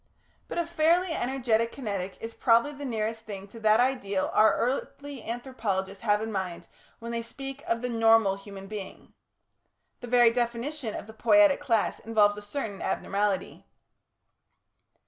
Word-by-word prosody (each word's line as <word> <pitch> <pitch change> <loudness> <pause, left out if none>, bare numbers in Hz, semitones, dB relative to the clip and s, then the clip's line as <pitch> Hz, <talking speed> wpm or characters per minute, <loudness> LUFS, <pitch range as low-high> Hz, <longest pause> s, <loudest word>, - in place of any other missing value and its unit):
But - - -6
a 340 - +1
fairly 340 +2 +2
energetic 240 -4 0
Kinetic 200 -7 -4
is 225 0 -6
probably 235 +5 +3
the 285 0 -8
nearest 225 -2 -2
thing 200 -3 -8
to 230 - -11
that 215 0 +4
ideal 205 -7 0
our 215 0 +5
earthly 270 +1 -3
anthropologists 220 -6 -3
have 210 -1 +2
in 225 - -4
mind 190 -4 -4 0.3
when 235 +1 -7
they 235 0 -2
speak 270 +4 -8
of 230 +1 -1
the 250 - -1
"Normal" 225 -3 +4
human 195 -1 -10
being. 200 -1 -8 0.9
The 245 - -8
very 240 -1 +5
definition 240 +1 -2
of - - -6
the 220 - -12
Poietic 300 +6 +5
class 225 -4 0
involves 210 -2 +3
a 210 - -8
certain 205 -2 -5
abnormality. 200 -1 -2
230 Hz, 150 wpm, -28 LUFS, 205-255 Hz, 0.9 s, our